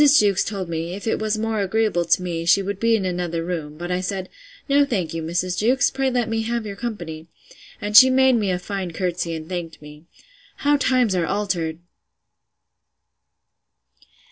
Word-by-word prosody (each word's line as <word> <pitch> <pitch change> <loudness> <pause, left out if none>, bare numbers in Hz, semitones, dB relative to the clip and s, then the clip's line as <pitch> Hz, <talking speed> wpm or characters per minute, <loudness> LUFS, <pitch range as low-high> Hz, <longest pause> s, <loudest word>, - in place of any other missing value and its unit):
Jewkes 215 -10 +5
told 195 -4 -4
me, 170 +1 -4
if 200 - -8
it 225 - 0
was 215 0 -1
more 220 -1 -1
agreeable 200 -3 +1
to 175 +2 +2
me, 170 -2 -3
she 180 +4 +4
would 200 0 -4
be 230 +1 +3
in 200 -4 -1
another 175 -2 -2
room; 155 -4 -5
but 175 +2 -5
I 180 0 0
said, 185 0 -4 0.4
No 285 0 +4
thank 195 - -2
you, 165 - -3
Mrs. 175 +3 -2
Jewkes; 255 +5 +2
pray 270 0 0
let 245 -3 0
me 225 0 -1
have 230 0 -2
your 200 -1 -6
company. 170 -9 -6 0.5
And 210 0 -4
she 260 +3 +10
made 265 0 +4
me 215 -5 +1
a 180 - +1
fine 185 -1 -5
courtesy, 175 -2 -2
and 160 0 -7
thanked 175 -3 -5
me.—How 175 - -4
times 255 -6 +2
are 175 -3 0
altered! 175 -5 -2
190 Hz, 180 wpm, -22 LUFS, 170-225 Hz, 0.5 s, she